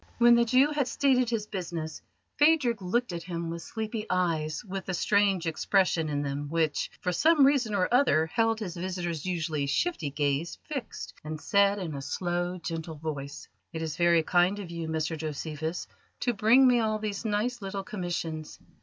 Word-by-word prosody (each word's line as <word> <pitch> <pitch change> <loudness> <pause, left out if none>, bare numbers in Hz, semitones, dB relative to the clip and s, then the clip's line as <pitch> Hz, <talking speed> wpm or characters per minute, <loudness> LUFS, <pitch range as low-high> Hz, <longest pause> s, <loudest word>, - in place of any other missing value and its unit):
When 240 0 +7
the 235 0 +5
Jew 260 +5 +4
had 290 -3 0
stated 255 -2 +2
his 225 -3 -1
business, 170 -5 -5 0.4
Phadrig 290 -8 +4
looked 190 +3 0
at 170 - -4
him 170 -1 -4
with 170 0 -5
sleepy 220 +2 -5
eyes 165 -2 0
with 195 -1 -6
a 185 - 0
strange 200 -1 +2
expression 165 0 +1
in 145 -1 -1
them 140 +1 -3
which, 160 -1 0
for 180 - 0
some 300 - +5
reason 255 -7 +2
or 185 -2 +2
other, 245 - +4
held 225 +6 +1
his 185 -6 -5
visitor's 175 -2 -3
usually 160 -5 -1
shifty 165 - 0
gaze 145 +3 -1
fixed, 280 -6 -6
and 155 0 -5
said 200 +3 +3
in 175 -6 -4
a 140 - -5
slow, 175 +4 -2
gentle 165 -1 -5
voice: 145 -2 -6 0.3
"It 160 0 -3
is 160 -1 -3
very 170 -1 +4
kind 180 +4 +3
of 190 -4 -7
you, 170 -1 -4
Mr 160 0 -1
Josephus, 155 +1 -4 0.4
to 245 - +1
bring 225 +5 +5
me 245 -1 +4
all 215 -1 +1
these 210 -1 -4
nice 225 +2 -1
little 195 0 -4
commissions. 170 -5 -4
180 Hz, 180 wpm, -28 LUFS, 160-220 Hz, 0.4 s, When